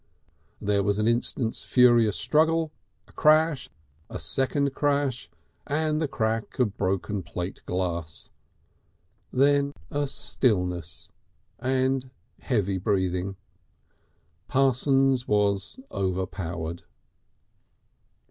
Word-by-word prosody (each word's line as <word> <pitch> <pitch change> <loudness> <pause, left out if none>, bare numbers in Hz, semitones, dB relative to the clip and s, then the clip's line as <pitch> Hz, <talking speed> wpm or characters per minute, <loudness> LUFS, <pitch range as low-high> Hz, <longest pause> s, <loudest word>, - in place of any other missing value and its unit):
There 100 0 +1
was 100 0 +1
an 105 +1 +1
instant's 115 0 0
furious 120 -6 +4
struggle, 160 - +2 0.4
a - - -19
crash, 155 -1 +3 0.4
a - - -5
second 135 - +1
crash 140 -4 0 0.4
and 155 +1 0
the 155 - +1
crack 115 -4 -2
of 110 -6 +1
broken 95 +2 -1
plate 90 +2 -6
glass. 85 -3 -3 1.0
Then 140 +1 +3 0.2
a 145 0 0
stillness 90 - 0 0.5
and 130 +1 0 0.3
heavy 100 -6 0
breathing. 95 -1 0 1.1
Parsons 135 -1 +2
was 100 - +1
overpowered.... 90 -3 -3
115 Hz, 90 wpm, -26 LUFS, 95-135 Hz, 1.1 s, furious